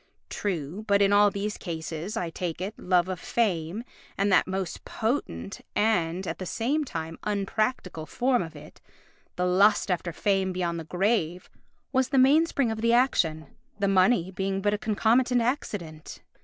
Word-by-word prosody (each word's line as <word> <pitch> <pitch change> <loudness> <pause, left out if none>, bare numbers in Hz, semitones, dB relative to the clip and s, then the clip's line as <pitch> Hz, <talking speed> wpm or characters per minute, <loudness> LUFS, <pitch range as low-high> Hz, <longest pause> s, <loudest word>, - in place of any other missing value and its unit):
True; 180 0 -3
but 200 -1 +4
in 200 0 +4
all 205 0 +6
these 205 +1 -4
cases, 165 +3 -5
I 170 -5 -2
take 170 -1 -4
it, 195 +4 -4
love 180 -1 +2
of 185 -2 -4
fame 190 -2 -1 0.3
and 200 +1 +1
that 180 - +4
most 190 -2 -4
potent 220 -4 -3
and, 190 -4 +1
at - - -4
the 185 - -4
same 275 - 0
time, 165 - -6
unpractical 200 -4 -2
form 250 0 +1
of 165 -2 -7
it, 145 - -13 0.5
the 180 - 0
lust 200 +2 +4
after 175 -1 -1
fame 190 +1 0
beyond 170 -2 -2
the 160 - -7
grave, 180 -1 -1 0.4
was 260 -1 +2
the 275 - +1
mainspring 275 -1 +4
of 220 0 -4
the 230 0 +3
action, 165 -11 +2 0.3
the 200 -1 0
money 190 -1 +3
being 195 +1 -2
but 205 +1 +1
a 210 - -1
concomitant 235 +4 +2
accident. 195 - -4
195 Hz, 165 wpm, -27 LUFS, 175-220 Hz, 0.5 s, all